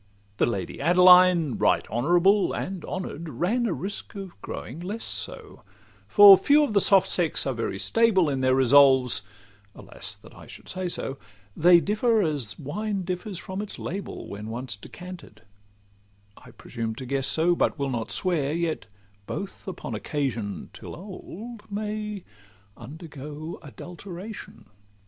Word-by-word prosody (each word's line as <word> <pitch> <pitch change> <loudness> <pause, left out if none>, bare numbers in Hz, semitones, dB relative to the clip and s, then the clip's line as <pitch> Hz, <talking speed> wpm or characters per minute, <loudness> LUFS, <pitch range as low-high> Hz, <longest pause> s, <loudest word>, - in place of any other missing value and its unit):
The - - +2
Lady 100 -6 -4
Adeline, 180 -4 +6
right - - +2
honourable; 175 - +3
And 185 -3 -4
honour'd, 170 -3 -5
ran 230 +10 0
a 190 - -1
risk 195 +4 -6
of 195 -2 -7
growing 130 +8 -7
less 200 +6 -5
so; - - -5 0.5
For 205 -2 +10
few 295 +1 +4
of 280 - -1
the 200 - +4
soft 195 -1 +4
sex 170 -4 0
are 135 - -1
very 115 -4 -3
stable 215 - +3
In 135 -2 -1
their 130 0 +3
resolves—alas! 120 -7 +1
that - - -17
I - - -14
should - - -12
say 185 -1 -3
so! 135 -5 -4 0.4
They 175 +2 +6
differ 215 +3 +1
as 145 - -2
wine 195 +7 -3
differs 185 +2 -4
from 190 +3 -5
its 210 - -7
label, 195 +3 -6
When 105 +2 -7
once 120 0 -4
decanted;—I 100 - -15
presume 115 -2 -6
to 130 - -7
guess 135 +1 0
so, 165 +4 +3
But - - 0
will 140 -2 -2
not 115 -3 -3
swear: 155 -6 +2
yet 165 -7 -2 0.4
both 200 0 -6
upon 175 -9 -6
occasion, 115 - -3
Till - - -9
old, 210 +4 -10
may 210 -1 -4 0.5
undergo 150 +3 -9
adulteration. 185 +6 -10
170 Hz, 140 wpm, -25 LUFS, 125-195 Hz, 0.5 s, For